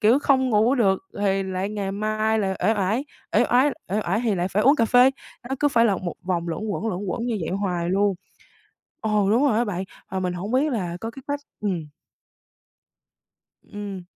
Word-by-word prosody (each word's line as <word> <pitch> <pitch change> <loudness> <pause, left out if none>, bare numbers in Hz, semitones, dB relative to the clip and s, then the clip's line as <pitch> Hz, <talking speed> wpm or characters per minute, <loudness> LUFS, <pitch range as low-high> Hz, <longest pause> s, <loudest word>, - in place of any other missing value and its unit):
kiểu, 230 +5 +5
không 260 -3 +2
ngủ 225 +4 +4
được 195 -7 +3
lài 195 -1 0
lại 190 +1 -3
ngày 200 -2 -3
mai 215 +1 0
lại 190 -2 -1
uể 220 - +4
oải, 210 +7 0 0.3
uể - - +5
oải 260 +4 +5 0.2
uể 210 - +2
oải 215 - 0
thì 215 -4 +2
lại 180 +1 -1
phải 210 +3 +1
uống 280 +4 +5
cà 230 - +3
phê, 250 +3 +6 0.4
nó 270 - -1
cứ 290 - +4
phải 235 -3 +3
là 200 -4 +3
một 175 -1 -4
vòng 175 -2 -2
luẩn 165 +6 -3
quẩn, 210 - -2
luẩn 185 -3 -3
quẩn 235 +6 -2
như 225 -4 -1
vậy 160 - -3
hoài 180 -3 -1
luôn. 200 +1 +2 0.9
Ồ, 210 -3 +1
đúng 245 +6 +3
rồi 225 -6 +3
á 240 - +2
bạn, 190 -3 -3 0.3
mà 190 - -1
mình 180 -1 -1
hổng 190 +5 -5
biết 280 +3 +2
là 180 -7 -2
có 225 - -4
cái 270 +2 -12
cách 285 0 -1 0.2
ừm. 180 -7 -2 1.8
Ừm. 205 -3 -7
210 Hz, 210 wpm, -24 LUFS, 190-235 Hz, 1.8 s, phê